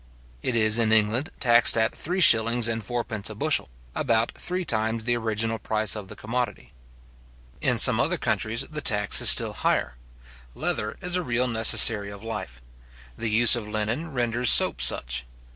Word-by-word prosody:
It 125 - -2
is 110 0 +3
in 110 -1 +1
England 110 +6 +2
taxed 120 -2 +5
at 110 0 0
three 180 +4 -3
shillings 115 -6 +4
and 115 -1 -3
fourpence 115 -1 -5
a 110 - -9
bushel; 150 - -1 0.2
about 115 - 0
three 180 +1 -5
times 110 -1 -1
the 120 +1 0
original 115 0 -3
price 110 +1 -1
of 105 -3 -8
the - - -11
commodity. 120 -4 -5 0.9
In - - +1
some - - +5
other - - 0
countries, - - -2
the - - -7
tax - - +1
is - - +6
still - - +3
higher. 60 -1 -2 0.6
Leather 105 0 -3
is 180 0 -1
a 180 - 0
real 125 -4 -1
necessary 110 -2 +3
of 100 +1 -11
life. 70 - -7 0.5
The 115 - -4
use 115 +2 +4
of 115 -3 -6
linen 110 +10 -3
renders 120 -2 -1
soap 60 - +3
such. - - -1
115 Hz, 170 wpm, -24 LUFS, 110-120 Hz, 0.9 s, is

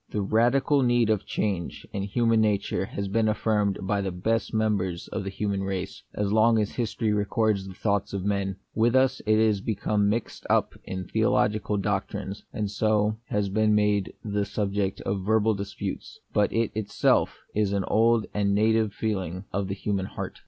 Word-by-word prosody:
The 105 - -2
radical 125 +7 +3
need 120 -3 +3
of 105 - +2
a - - -26
change 95 -6 -2
in 100 - -2
human 115 +3 +2
nature 105 -2 0
has 100 +1 -4
been 110 +3 +1
affirmed 105 -2 +1
by 100 +1 0
the 95 -1 -2
best 110 +6 -1
members 100 -5 0
of 110 - -3
the 100 - -3
human 100 0 -2
race, 95 -2 -4
as 105 0 0
long 110 +1 +5
as 105 -2 0
history 115 -2 -1
records 105 -1 +1
the 95 - -9
thoughts 100 0 0
of 100 -1 -3
men: 100 -2 0 0.2
with 115 +3 +2
us 130 -1 +3
it 110 0 +4
has 110 -3 +3
become 105 -1 0
mixed 110 +2 -3
up - - +2
with 95 -1 -5
theologic 105 0 +2 0.2
doctrines, 100 0 -3
and 105 -2 -3
so 110 0 +1
has 105 -1 0
been 105 +1 +2
made 105 -2 +1
the 105 -1 0
subject 100 -1 -2
of 95 -1 -2
verbal 110 +2 +3
disputes; 100 0 -5
but 105 -1 +2
it 115 -1 0
is 110 -1 -2
itself 105 0 +2 0.2
an 100 -2 +1
old 115 +2 +3
and 100 -1 +1
native 110 0 +2
feeling 95 -4 -3
of 100 0 -1
the 100 - -3
human 100 -1 -2
heart. - - -6
105 Hz, 180 wpm, -26 LUFS, 100-110 Hz, 0.2 s, long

